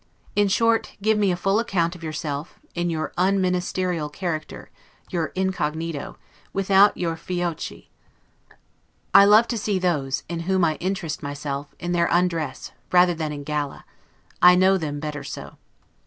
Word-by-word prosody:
In 205 0 +4
short, 230 +3 +2
give 215 0 +3
me 200 -2 +3
a - - 0
full 195 +3 +1
account 180 -7 0
of 175 - -12
yourself, 150 0 -5
in 175 0 -1
your 160 -2 -3
un 195 +2 +3
ministerial 180 -3 -1
character, 155 -1 -5 0.4
your 165 -3 0
incognito, 165 -5 -2 0.4
without 195 +1 +4
your 165 -2 -1
'fiocchi'. 175 0 -4 1.2
I 200 - +9
love 215 +3 +6
to 235 -2 -1
see 205 -1 0
those, 140 -7 0
in 170 0 -4
whom 190 -2 +3
I 155 -2 0
interest 185 -4 -3
myself, 145 0 -5
in 175 0 -3
their 170 -1 +2
undress, 165 -6 0 0.2
rather 180 0 +5
than 160 -2 -3
in 145 -1 -6
gala; 150 -1 -3 0.6
I 180 0 +8
know 190 +1 +5
them 150 -5 -3
better 150 -1 -5
so. - - -8
175 Hz, 155 wpm, -23 LUFS, 155-190 Hz, 1.2 s, I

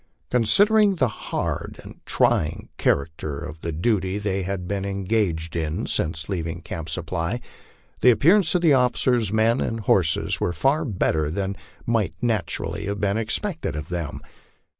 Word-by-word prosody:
Considering 200 - +4
the 130 -7 +2 0.2
hard - - -3
and - - -12
trying 75 0 +1
character 75 0 0
of 75 +3 -8
the 85 - -3
duty 95 +3 0
they 100 -2 -1
had 95 -1 -3
been 100 0 -2
en 100 0 -3
gaged 90 -6 0
in 80 -1 -2
since 80 -1 -1
leaving 85 -4 -3
Camp 80 -1 -6
Supply, 85 +6 -2 0.6
the 125 - +6
appearance 170 - +4
of 175 -1 +2
officers, 125 -5 +3
men, 110 +3 +2
and 115 0 -2
horses 90 -6 +2
was 85 -2 -1
far 145 - +2
better 80 - 0
than 95 +3 -2 0.3
might 115 -4 0
naturally 105 -2 -2
have 100 0 -2
been 100 -1 +1
expected 135 - -2
of 75 -1 -5
them. 85 -5 -4
100 Hz, 150 wpm, -24 LUFS, 85-120 Hz, 0.6 s, the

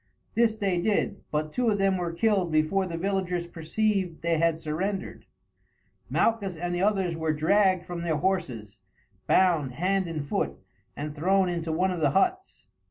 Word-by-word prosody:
This 230 -1 +3
they 195 -5 0
did, 205 +2 0
but 155 0 -2
two 245 +4 +1
of 205 - +1
them 195 -1 +2
were 175 -2 -2
killed 190 -1 +1
before 155 +5 +2
the 165 -2 -4
villagers 180 -1 -1
perceived 180 +1 -1
they 165 -1 +1
had 165 -1 +2
surrendered. 175 +5 -4 0.8
Malchus 205 -5 +1
and 175 +2 -3
the 175 - -1
others 190 -4 +1
were 160 -1 -1
dragged 185 +3 +2
from 175 -1 -5
their 165 -3 0
horses, 145 - -2 0.5
bound 165 -9 +3
hand 185 +6 0
and 155 -4 -4
foot, - - -1 0.4
and 150 +1 -5
thrown 185 +4 +2
into 170 -2 -2
one 180 +4 +1
of 180 - -3
the 150 -3 +3
huts. 370 - 0
175 Hz, 165 wpm, -27 LUFS, 160-195 Hz, 0.8 s, This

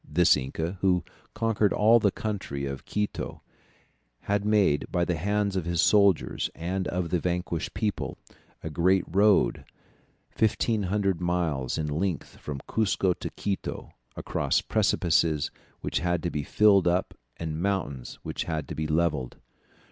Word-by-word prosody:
This 90 +3 +4
inca, 80 +7 -4
who 90 -2 +3 0.3
conquered 110 -2 +1
all 110 +3 +5
the 105 - +3
country 95 -10 -4
of 70 -1 -6
Quito, 105 0 -3 0.8
had 100 0 0
made, 105 -8 +2
by 85 -1 +1
the 90 - 0
hands 100 +3 0
of 95 -4 -1
his 85 -1 -1
soldiers 100 -3 +3
and 90 +3 -2
of 90 -2 -2
the 90 - +2
vanquished 90 -1 -2
people, 105 -3 -2 0.5
a 80 - -4
great 90 +4 +3
road 100 +3 +3 0.7
1500 105 -4 +1
miles 85 -8 -1
in 80 - -1
length 80 +3 -2
from 70 -2 -6
Cuzco 95 -4 +1
to - - -4
Quito, 100 -2 -4 0.2
across - - 0
precipices 80 -3 +1 0.3
which - - -1
had 85 0 0
been 75 -4 -2
filled 100 -4 +4
up 90 +2 +1 0.2
and 80 -1 -4
mountains 90 -10 -2
which - - -4
had 80 -3 -2
been 75 +1 -1
levelled. 75 -7 0
90 Hz, 140 wpm, -27 LUFS, 80-100 Hz, 0.8 s, all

